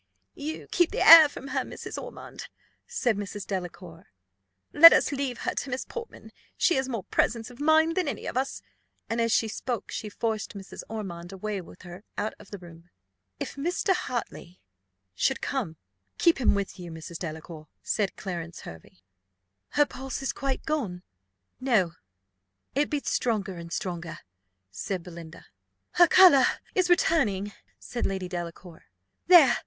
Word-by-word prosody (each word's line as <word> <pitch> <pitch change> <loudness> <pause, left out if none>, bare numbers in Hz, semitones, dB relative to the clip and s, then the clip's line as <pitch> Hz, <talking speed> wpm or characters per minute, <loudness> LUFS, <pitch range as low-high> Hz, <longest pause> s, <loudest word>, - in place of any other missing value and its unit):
"You 305 +2 -6
keep 350 -2 +3
the - - 0
air 320 -2 +11
from 275 -1 -9
her, - - 0
Mrs. - - -6
Ormond," - - -9 0.4
said 255 - 0
Mrs. 205 0 -5
Delacour. 180 -3 -6 0.7
"Let 335 +2 +11
us - - +3
leave 270 -3 -3
her - - -1
to 280 - -4
Miss 250 +1 -3
Portman; 470 -1 -9 0.3
she 345 - +3
has 265 0 -1
more 230 -6 -3
presence 225 +5 0
of 245 - -15
mind 315 +2 +4
than 365 -4 0
any - - -4
of - - -4
us." 265 +2 -2 0.5
And 230 +1 0
as 230 0 +1
she 225 - +3
spoke 225 0 -4
she 215 - -5
forced 215 -1 -3
Mrs. 195 -1 -9
Ormond 180 -5 -6
away 195 +1 -4
with 180 - -15
her 175 +2 -10
out 215 - -2
of - - -15
the 200 - -7
room. 170 -1 -15 0.5
"If - - -5
Mr. 350 +6 0
Hartley 235 - -5 0.5
should - - 0
come, 160 -1 -3 0.4
keep 330 -5 +3
him 230 - +4
with 200 -1 -4
you, 175 -1 -7
Mrs. 165 +1 -8
Delacour," 160 -1 -7 0.2
said 205 -3 -1
Clarence 170 -3 -6
Hervey. 80 -1 -11
"Is - - -29 0.8
her 295 - +5
pulse 270 -1 -5
quite 270 -1 -3
gone?" 215 - -2 0.6
"No; 225 -10 +2 0.8
it 290 +2 +1
beats 290 -2 -2
stronger 210 -6 -1
and 170 0 -9
stronger," 175 -2 -4 0.5
said 175 - -4
Belinda. 170 -1 -11 0.5
"Her 350 -1 +6
colour 335 -10 +7 0.3
is 370 -1 +1
returning," 210 - +2 0.2
said 240 - -3
Lady 190 -1 -3
Delacour. 175 -1 -7 0.4
"There! 335 -8 +7
215 Hz, 160 wpm, -27 LUFS, 180-275 Hz, 0.8 s, air